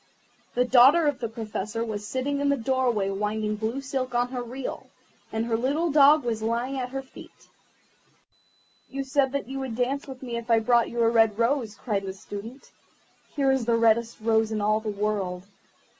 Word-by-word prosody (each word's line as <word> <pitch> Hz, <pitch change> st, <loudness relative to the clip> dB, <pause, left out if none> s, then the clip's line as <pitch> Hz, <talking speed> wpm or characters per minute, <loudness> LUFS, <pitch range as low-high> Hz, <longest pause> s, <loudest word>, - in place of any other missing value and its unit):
The 250 Hz, -, +3 dB
daughter 265 Hz, +7 st, +6 dB
of 290 Hz, -2 st, 0 dB
the 230 Hz, -2 st, -3 dB
Professor 225 Hz, 0 st, -4 dB
was 210 Hz, -2 st, -5 dB
sitting 280 Hz, +4 st, -2 dB
in 285 Hz, 0 st, +1 dB
the 280 Hz, -, +2 dB
doorway 240 Hz, -5 st, 0 dB
winding 210 Hz, +1 st, -2 dB
blue 225 Hz, +5 st, -3 dB
silk 260 Hz, -2 st, -3 dB
on 245 Hz, +1 st, 0 dB
a 250 Hz, -, -2 dB
reel, 250 Hz, +2 st, -6 dB, 0.4 s
and 220 Hz, +1 st, -1 dB
her 230 Hz, -1 st, 0 dB
little 285 Hz, +8 st, 0 dB
dog 290 Hz, +1 st, +6 dB
was 230 Hz, -2 st, -2 dB
lying 240 Hz, +4 st, -1 dB
at 250 Hz, -1 st, -3 dB
her 270 Hz, +1 st, -5 dB
feet. 265 Hz, -, -15 dB, 1.4 s
"You 275 Hz, 0 st, -4 dB
said 270 Hz, 0 st, +1 dB
that 280 Hz, -3 st, -2 dB
you 270 Hz, +1 st, -5 dB
would 260 Hz, -4 st, -4 dB
dance 260 Hz, +4 st, -1 dB
with 265 Hz, -1 st, -9 dB
me 240 Hz, -2 st, -4 dB
if 235 Hz, +1 st, -7 dB
I 230 Hz, -, +5 dB
brought 235 Hz, +1 st, +3 dB
you 235 Hz, -, -2 dB
a -, -, +4 dB
red 225 Hz, -2 st, +3 dB
rose," 230 Hz, -2 st, 0 dB
cried 210 Hz, -5 st, -2 dB
the 190 Hz, -, -4 dB
Student. 205 Hz, +7 st, -9 dB, 0.6 s
"Here 275 Hz, -2 st, +2 dB
is 265 Hz, -3 st, 0 dB
the 230 Hz, 0 st, +2 dB
reddest 230 Hz, 0 st, +2 dB
rose 220 Hz, 0 st, +2 dB
in 215 Hz, -, -1 dB
all 215 Hz, +1 st, +2 dB
the 220 Hz, 0 st, -5 dB
world. 200 Hz, -3 st, -2 dB
235 Hz, 195 wpm, -26 LUFS, 220-265 Hz, 1.4 s, daughter